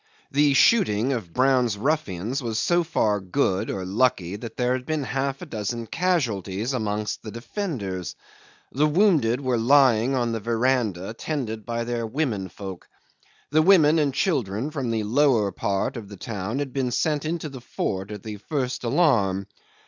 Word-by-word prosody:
The 145 Hz, -1 st, +3 dB
shooting 130 Hz, -, +4 dB
of 105 Hz, -9 st, -5 dB
Brown's 125 Hz, -2 st, +2 dB
ruffians 130 Hz, -, -1 dB
was 115 Hz, -3 st, -3 dB
so 175 Hz, +8 st, +2 dB
far 105 Hz, -10 st, +1 dB
good, 95 Hz, 0 st, 0 dB
or 95 Hz, -1 st, -3 dB
lucky, 100 Hz, -3 st, +1 dB
that 110 Hz, +2 st, -8 dB
there 125 Hz, 0 st, +1 dB
had 130 Hz, 0 st, -2 dB
been 155 Hz, +2 st, -2 dB
half 135 Hz, +1 st, -2 dB
a -, -, -6 dB
dozen 115 Hz, +2 st, -4 dB
casualties 115 Hz, -, -1 dB
amongst 105 Hz, -3 st, -2 dB
the 110 Hz, -, -8 dB
defenders. 115 Hz, -, -4 dB, 0.6 s
The 150 Hz, +4 st, +2 dB
wounded 150 Hz, -, +3 dB
were 130 Hz, -3 st, 0 dB
lying 130 Hz, -1 st, +4 dB
on 120 Hz, -2 st, 0 dB
the 115 Hz, -, -2 dB
verandah 115 Hz, -4 st, 0 dB
tended 115 Hz, -5 st, -4 dB
by 115 Hz, 0 st, -2 dB
their 120 Hz, -1 st, -2 dB
women 110 Hz, -7 st, -2 dB
folk. 95 Hz, 0 st, -9 dB, 0.6 s
The 155 Hz, +1 st, +5 dB
women 160 Hz, -3 st, +5 dB
and 145 Hz, -2 st, +2 dB
children 130 Hz, -, -1 dB
from 135 Hz, -6 st, -3 dB
the 110 Hz, -1 st, 0 dB
lower 115 Hz, -2 st, +3 dB
part 100 Hz, +3 st, -1 dB
of 105 Hz, -4 st, -8 dB
the 100 Hz, -, -10 dB
town 105 Hz, +3 st, -4 dB
had 140 Hz, -3 st, -3 dB
been 130 Hz, -2 st, 0 dB
sent 150 Hz, +4 st, 0 dB
into 160 Hz, 0 st, -3 dB
the 135 Hz, -4 st, -9 dB
fort 95 Hz, -5 st, -3 dB
at 105 Hz, -2 st, -7 dB
the 105 Hz, -1 st, -6 dB
first 130 Hz, +2 st, -3 dB
alarm. 115 Hz, -, +2 dB
120 Hz, 165 wpm, -24 LUFS, 105-140 Hz, 0.6 s, The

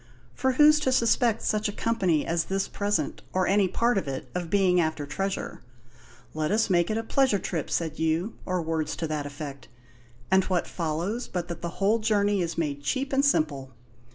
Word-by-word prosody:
For 260 Hz, -, 0 dB
who's 300 Hz, +3 st, +6 dB
to 265 Hz, -3 st, +1 dB
suspect 235 Hz, -2 st, +2 dB
such 215 Hz, 0 st, 0 dB
a -, -, -3 dB
company 190 Hz, -9 st, 0 dB
as 165 Hz, 0 st, 0 dB
this 195 Hz, 0 st, -1 dB
present, 205 Hz, 0 st, -2 dB
or 185 Hz, 0 st, +2 dB
any 195 Hz, 0 st, +3 dB
part 235 Hz, +3 st, +1 dB
of 185 Hz, -, -7 dB
it, 135 Hz, -1 st, -5 dB
of 175 Hz, -2 st, -3 dB
being 185 Hz, -2 st, +3 dB
after 155 Hz, -2 st, -2 dB
treasure? 195 Hz, +8 st, -4 dB, 0.7 s
'Let 155 Hz, 0 st, -1 dB
us 215 Hz, 0 st, +1 dB
make 175 Hz, -1 st, +3 dB
it 215 Hz, -, 0 dB
a 225 Hz, -, -2 dB
pleasure 260 Hz, -2 st, +2 dB
trip,' 170 Hz, -5 st, -3 dB
said 160 Hz, -2 st, -2 dB
you, 160 Hz, +6 st, 0 dB
or 185 Hz, -2 st, -1 dB
words 160 Hz, -1 st, -2 dB
to 165 Hz, -, -3 dB
that 150 Hz, -2 st, -3 dB
effect; 145 Hz, -1 st, -8 dB, 0.6 s
and 190 Hz, 0 st, +5 dB
what 180 Hz, -2 st, 0 dB
follows 175 Hz, +8 st, -3 dB
but 180 Hz, -1 st, -4 dB
that 170 Hz, -1 st, -6 dB
the 170 Hz, -, -3 dB
whole 205 Hz, +3 st, +2 dB
journey 205 Hz, -2 st, +2 dB
is 170 Hz, -1 st, -3 dB
made 145 Hz, -4 st, -2 dB
cheap 265 Hz, -, -2 dB
and 270 Hz, +1 st, +3 dB
simple? 145 Hz, -, +1 dB
185 Hz, 195 wpm, -26 LUFS, 160-215 Hz, 0.7 s, who's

